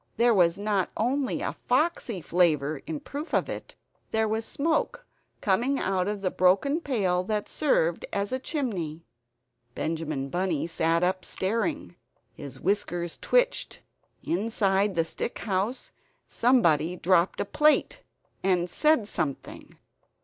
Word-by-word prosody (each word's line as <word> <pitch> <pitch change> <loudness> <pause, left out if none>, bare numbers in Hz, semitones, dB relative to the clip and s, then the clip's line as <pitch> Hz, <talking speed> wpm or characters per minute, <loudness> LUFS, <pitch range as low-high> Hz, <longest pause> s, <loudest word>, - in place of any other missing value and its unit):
There 235 +1 +4
was 175 -3 +3
not 200 -2 0
only 260 +4 0
a - - -2
foxy 255 - +1
flavor 155 -4 +1
in 160 -2 -4
proof 290 +3 -5
of - - +1
it - - -7 0.3
there 220 0 +1
was 220 +1 -1
smoke 335 - -1 0.4
coming 240 +8 +1
out 190 -4 0
of 205 -1 -3
the 185 -2 0
broken 195 - +3
pail 190 - 0
that 210 0 -2
served 170 - +1
as 200 0 -1
a 260 - -1
chimney. 190 - -3 0.7
Benjamin 155 -4 -3
Bunny 175 -2 -1
sat 165 0 +1
up, 185 +1 0
staring, 230 - -2 0.4
his 135 -2 -9
whiskers 175 -3 -1
twitched. - - +1 0.4
Inside 200 0 +1
the 165 - +3
stick 200 - -4
house 205 +5 -2 0.4
somebody 175 - +3
dropped 180 0 +2
a - - 0
plate, 300 +8 +2 0.4
and 180 -2 +1
said 300 - +3
something. 140 -9 -5
195 Hz, 130 wpm, -27 LUFS, 170-240 Hz, 0.7 s, There